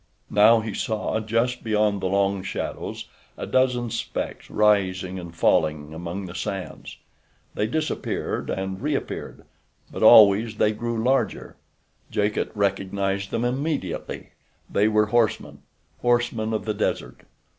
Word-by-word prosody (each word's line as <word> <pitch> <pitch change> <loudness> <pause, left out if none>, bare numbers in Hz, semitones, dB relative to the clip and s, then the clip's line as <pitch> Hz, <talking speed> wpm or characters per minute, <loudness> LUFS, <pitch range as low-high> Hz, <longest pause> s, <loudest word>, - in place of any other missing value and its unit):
Now 110 +2 +6
he 110 -2 -5
saw, 110 +1 -2
just 115 +3 -1
beyond 105 -2 +1
the 95 - 0
long 100 0 +1
shadows, 95 - -5 0.3
a - - -4
dozen 125 -2 +1
specks 115 - -4
rising 95 -3 +1
and 85 -2 -9
falling 75 -2 +1
among 85 +4 -5
the 85 - -8
sands. 90 -1 -6 0.6
They 105 - -1
disappeared 155 +6 -2
and 95 +1 -3
reappeared, 150 +2 -4 0.5
but - - -6
always 110 +1 +7
they 105 - +2
grew 115 +1 -3
larger. 130 +2 0 0.5
Jacot 105 0 0
recognized 100 -1 -1
them 120 - -1
immediately. 130 - -3 0.4
They 105 +2 +2
were 105 0 +3
horsemen—horsemen 120 +1 -1
of 110 -3 -2
the 110 - -1
desert. 105 - -3
105 Hz, 125 wpm, -24 LUFS, 95-115 Hz, 0.6 s, always